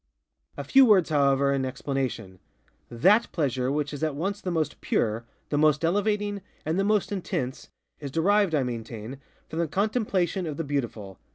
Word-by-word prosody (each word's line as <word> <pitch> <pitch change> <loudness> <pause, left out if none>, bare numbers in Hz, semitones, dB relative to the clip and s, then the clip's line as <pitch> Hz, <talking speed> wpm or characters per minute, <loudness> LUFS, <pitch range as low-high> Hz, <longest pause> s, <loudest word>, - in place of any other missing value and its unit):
A - - -4
few 270 0 +6
words, 195 -10 +4
however, 140 -1 +3
in 135 -1 0
explanation. 130 -7 -3 0.5
_That 195 - +4
_pleasure 130 -4 -1
which 145 0 -2
is 145 - -6
at 155 -3 0
once 195 +7 -3
the 185 - -3
most 160 -4 -2
pure, 110 +1 0 0.2
the 145 - 0
most 155 +1 +3
elevating, 205 +2 0 0.2
and 160 +4 0
the - - +2
most 210 0 +1
intense, 135 -9 -4 0.3
is 145 - -6
derived, 190 +4 +2
I 140 - +2
maintain, 115 +1 -6 0.3
from 160 - -5
the 170 - +1
contemplation 195 - 0
of 150 -2 -5
the 165 - -2
Beautiful. 115 - -4
150 Hz, 170 wpm, -26 LUFS, 130-195 Hz, 0.5 s, few